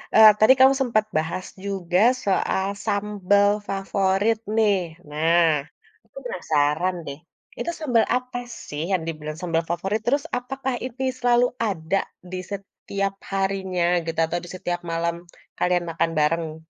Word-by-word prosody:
eee, 220 -1 +10
tadi 215 +5 +7
kamu 265 +1 +7
sempat 215 -4 +2
bahas 170 +4 -2 0.2
juga 185 -2 0 0.3
soal 190 0 +1 0.2
sambal 205 -1 +2 0.2
favorit 195 +2 +1 0.2
nih. 210 -3 +4 0.3
Nah, 165 +3 +3 0.6
aku - - -20
penasaran 160 - 0
deh, 140 0 -5 0.4
itu 340 - -2
sambal 245 -7 +2
apa 250 -1 -3 0.3
sih 150 +1 -4
yang 185 -3 +2
dibilang 155 -1 -5
sambal 165 -2 0
favorit? 195 +5 -1
Terus 280 +3 +2
apakah 265 +1 -3
ini 260 +1 -5 0.2
selalu 245 0 +4 0.2
ada 190 -1 -1 0.3
di 185 - -3
setiap 195 0 -4 0.2
harinya 190 -2 0 0.2
gitu 165 0 -3
atau 175 +2 -2
di 175 - -9
setiap 175 -1 -3
malam 170 0 0 0.4
kalian 180 -1 +1
makan 165 0 0
bareng? 160 +1 0
195 Hz, 135 wpm, -24 LUFS, 170-215 Hz, 0.6 s, eee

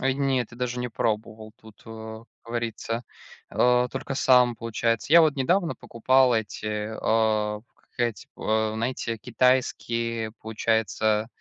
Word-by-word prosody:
Ой, 135 0 +1
нет, 135 -3 0
я - - -11
даже 125 0 -3
не 125 0 -2
пробовал, 110 -2 -3
тут, 110 -1 -17
э, 110 0 -9 0.2
говорится, 115 0 -3 0.5
э, 125 0 +3
только 135 - -4
сам, 125 -2 +4
получается. 115 +2 -1
Я 170 - +10
вот 155 -3 +4
недавно 170 +6 +1
покупал 125 +1 +2
эти, 110 -1 -3 0.3
э, 110 -1 +1
как - - -34
эти 120 -3 -2
п - - -12
э, 110 0 +1
знаете, 115 0 -2
китайские, 115 -2 0
получается, 110 -1 0
115 Hz, 135 wpm, -25 LUFS, 110-125 Hz, 0.5 s, Я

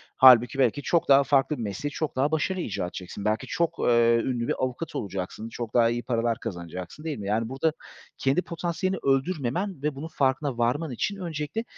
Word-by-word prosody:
Hâlbuki 130 0 +7
belki 130 +2 +2
çok 170 +3 +1
daha 140 0 +7
farklı 140 +2 +2
bir - - -5
mesleği 105 +8 -3
çok 155 0 -3
daha 135 +3 +1
başarıyla 175 +3 -1
icra 95 - -3
edeceksin. 90 +2 -7
Belki 110 +1 0
çok, 170 -1 -1
eee, 115 -1 +4
ünlü 120 -2 -1
bir - - +1
avukat 130 +6 -3
olacaksın, 100 +2 -4
çok 115 -1 -6
daha 115 -1 +5
iyi 120 +1 -2
paralar 115 -1 0
kazanacaksın, 90 - -7
değil 160 -2 -3
mi? 100 - -5
Yani 110 +2 0
burada 145 +5 0 0.4
kendi 135 +6 +2
potansiyelini 175 +2 -2
öldürmemen 145 +4 0
ve 150 -1 -1
bunun 145 +4 -6
farkına 135 -3 0
varman 130 +6 0
için 200 - -2
öncelikle 170 +3 -4
135 Hz, 190 wpm, -26 LUFS, 115-155 Hz, 0.4 s, Hâlbuki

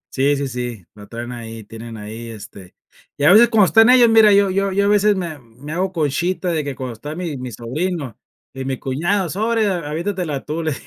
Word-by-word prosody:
Sí, 140 +2 +2
sí, 140 0 -2
sí, 120 -7 -5
lo 105 -1 -13
traen 120 +1 -7
ahí, 115 -2 -8
tienen 115 +1 -10
ahí, 110 +2 -8
este 100 -4 -12 0.4
y 140 - -3
a 150 - +7
veces 235 +3 +7
cuando 215 -4 +5
están 225 +5 +5
ellos, 250 -2 +7
mira, 220 -2 +6
yo 200 -1 +4
yo 195 +1 0
yo 200 +1 +1
a - - +2
veces 210 0 +3
me 170 -6 -5
me 125 +5 -12
hago 185 +2 -1
conchita 175 +3 -1
de 160 -3 -1
que 140 -1 -5
cuando 130 -2 -5
está 145 +7 -8
mi 170 -4 -4
mi 125 -1 -6
sobrino 135 - -4 0.4
y 135 0 -6
mi 130 -1 -3
cuñado, 170 +8 -1
sorry, 220 +3 0
a 175 -7 -2
avientatela 170 -3 -3
tu, 155 +2 -3
le 160 -1 -1
150 Hz, 220 wpm, -19 LUFS, 120-190 Hz, 0.4 s, a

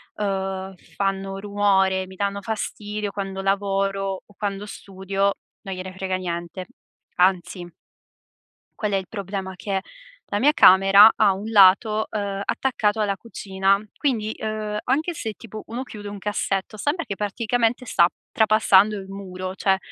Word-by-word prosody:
uhm, 195 -1 -3 0.2
fanno 195 -1 -2
rumore, 195 -2 +1
mi 190 - -12
danno 200 +1 -2
fastidio 210 0 -4
quando 195 -1 -4
lavoro 195 0 -1
o 205 - -21
quando 205 -1 -3
studio, 195 0 -2 0.3
non 195 -1 -5
gliene 185 0 -7
frega 190 0 -3
niente, 175 0 -5 0.5
anzi. 180 -1 +1 1.1
Qual 210 -1 -1
è - - +1
il 190 -1 -2
problema, 195 -2 -5
che 195 +1 -2 0.5
la 205 - 0
mia 290 +6 +4
camera 195 - +8
ha 205 -3 +4
un 200 +3 -6
lato, 215 +1 +5
uhm, 200 -2 -3
attaccato 220 -5 0
alla 200 -2 0
cucina; 195 -2 0 0.2
quindi, 225 -7 -1
uhm, 215 -1 -3
anche 310 +7 0
se 225 -8 -5
tipo 215 -1 -10
uno 240 +3 -4
chiude 210 -5 -9
un 205 0 -6
cassetto, 200 0 -2
sembra 295 - -1
che 200 - -4
praticamente 230 +4 -1
sta 170 -7 +4 0.2
trapassando 215 -1 +4
il 190 -1 -9
muro 185 -1 -6
cioè, 195 -1 +2
200 Hz, 145 wpm, -23 LUFS, 190-215 Hz, 1.1 s, camera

